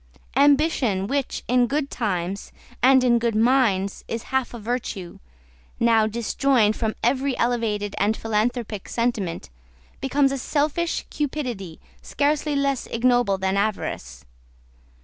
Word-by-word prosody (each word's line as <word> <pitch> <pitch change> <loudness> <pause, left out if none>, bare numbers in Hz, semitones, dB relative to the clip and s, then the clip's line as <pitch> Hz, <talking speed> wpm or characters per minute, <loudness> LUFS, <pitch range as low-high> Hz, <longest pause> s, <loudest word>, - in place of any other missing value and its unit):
Ambition, 275 - +3
which, 275 +4 -2
in 250 0 +3
good 280 +2 -2
times, 190 -3 -3 0.3
and 260 +1 +6
in 240 -1 +4
good 230 -1 0
minds, 220 -5 +2
is 230 0 -4
half 265 -1 +1
a 240 - -7
virtue, 220 -5 -4 0.6
now, 225 -2 +4
disjoined 230 0 +1
from 220 0 -2
every 260 +2 +1
elevated 220 -4 0
and 210 +3 +1
philanthropic 225 -1 -2
sentiment, 210 - -2 0.5
becomes 270 +1 +2
a 275 - -2
selfish 310 +5 -1
cupidity 250 - -4 0.2
scarcely 295 +1 0
less 275 -2 0
ignoble 245 -4 +2
than 190 0 -1
avarice. 65 - -3
235 Hz, 120 wpm, -23 LUFS, 210-270 Hz, 0.6 s, and